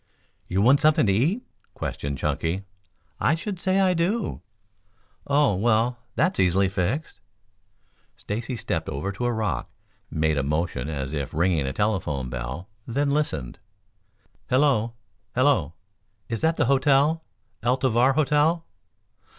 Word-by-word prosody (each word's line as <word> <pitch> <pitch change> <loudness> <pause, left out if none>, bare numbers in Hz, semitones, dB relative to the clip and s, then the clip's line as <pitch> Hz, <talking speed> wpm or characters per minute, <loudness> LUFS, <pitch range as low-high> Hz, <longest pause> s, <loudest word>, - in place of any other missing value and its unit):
"You 95 +2 +1
want 135 +5 +5
something 155 -5 +4
to 100 - +3
eat?" 160 - +1 0.3
questioned 70 -1 -4
Chunky. 80 +7 -1 0.6
"I 155 - +3
should 190 +2 -5
say 190 +2 +2
I 190 -1 +4
do." 190 +6 -1 0.9
"Oh, 145 -4 +3
well, 115 +4 +1 0.2
that's 175 - +1
easily 95 +1 +3
fixed." 100 - -2 1.0
Stacy 115 +4 -4
stepped 115 - -3
over 75 +9 -3
to 110 +5 -4
a 120 - +2
rock, 105 - -2 0.4
made 80 -1 +1
a - - +2
motion 75 -2 -1
as 70 -2 -4
if 70 -2 -4
ringing 80 -4 +2
a - - -1
telephone 75 - -1
bell, 65 +8 -5 0.2
then 140 +4 0
listened. 80 - -1 0.9
"Hello! 130 -4 +3 0.4
hello! 125 - +2 0.5
Is 115 -1 -3
that 160 +1 +2
the - - +2
hotel, 140 +4 +3 0.4
El 120 +3 +2
Tovar 130 0 +3
Hotel? 155 +3 +2
115 Hz, 135 wpm, -25 LUFS, -, 1.0 s, want